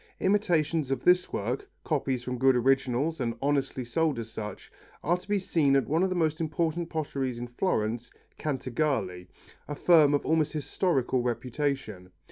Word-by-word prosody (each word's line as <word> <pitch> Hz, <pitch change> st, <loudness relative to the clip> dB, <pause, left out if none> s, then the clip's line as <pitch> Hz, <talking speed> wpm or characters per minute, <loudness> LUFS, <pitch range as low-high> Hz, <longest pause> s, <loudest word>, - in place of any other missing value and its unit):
Imitations 165 Hz, -7 st, +1 dB
of 135 Hz, -, -2 dB
this 180 Hz, 0 st, +4 dB
work, 120 Hz, +6 st, -3 dB
copies 135 Hz, -5 st, -1 dB
from 125 Hz, -1 st, -4 dB
good 130 Hz, 0 st, +5 dB
originals 135 Hz, +4 st, +1 dB
and 115 Hz, -2 st, -1 dB
honestly 135 Hz, -2 st, 0 dB
sold 155 Hz, +4 st, 0 dB
as 115 Hz, -1 st, -6 dB
such, 105 Hz, -2 st, -7 dB, 0.3 s
are 170 Hz, +4 st, +2 dB
to 180 Hz, +1 st, -9 dB
be 205 Hz, 0 st, +1 dB
seen 160 Hz, -7 st, +2 dB
at 135 Hz, -, +2 dB
one 160 Hz, +4 st, +1 dB
of 190 Hz, -, +2 dB
the 185 Hz, -, -2 dB
most 160 Hz, -2 st, 0 dB
important 165 Hz, +1 st, -1 dB
potteries 135 Hz, -6 st, -3 dB
of 120 Hz, 0 st, -6 dB
Florence, 120 Hz, -, -1 dB, 0.3 s
Cantagalli, 130 Hz, -10 st, -2 dB, 0.4 s
a 145 Hz, -, -4 dB
firm 150 Hz, -3 st, +5 dB
of 145 Hz, -, -2 dB
almost 160 Hz, -1 st, +1 dB
historical 140 Hz, -4 st, 0 dB
reputation. 120 Hz, -5 st, -3 dB
140 Hz, 160 wpm, -28 LUFS, 125-160 Hz, 0.4 s, good